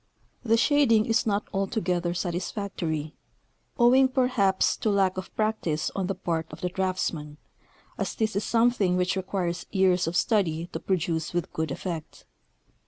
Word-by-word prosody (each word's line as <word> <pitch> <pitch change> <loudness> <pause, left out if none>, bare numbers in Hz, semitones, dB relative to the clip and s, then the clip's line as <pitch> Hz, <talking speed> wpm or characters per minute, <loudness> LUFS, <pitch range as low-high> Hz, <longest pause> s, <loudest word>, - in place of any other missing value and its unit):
The 230 -1 +3
shading 230 -5 +4
is 230 +1 +1
not 205 0 0
altogether 180 -3 -1
satis 175 0 -2
factory, 160 -7 -3 0.6
owing, 260 +1 +6
perhaps, 250 -8 +2
to 220 - 0
lack 195 -2 +2
of 185 0 -6
practice 215 -8 -1
on 190 -2 -1
the 195 - -2
part 165 -3 -2
of - - -10
the 180 - -1
draughtsman, 180 -5 -2 0.6
as - - -2
this 215 -3 -1
is 200 - 0
something 230 -6 +2
which 180 +1 +1
requires 185 -2 -3
years 185 -3 +3
of 165 - -2
study 170 -7 +1
to 160 - -3
produce 165 -3 -1
with 175 -2 -2
good 160 -1 -2
effect. 160 +2 -6
190 Hz, 155 wpm, -26 LUFS, 170-215 Hz, 0.6 s, owing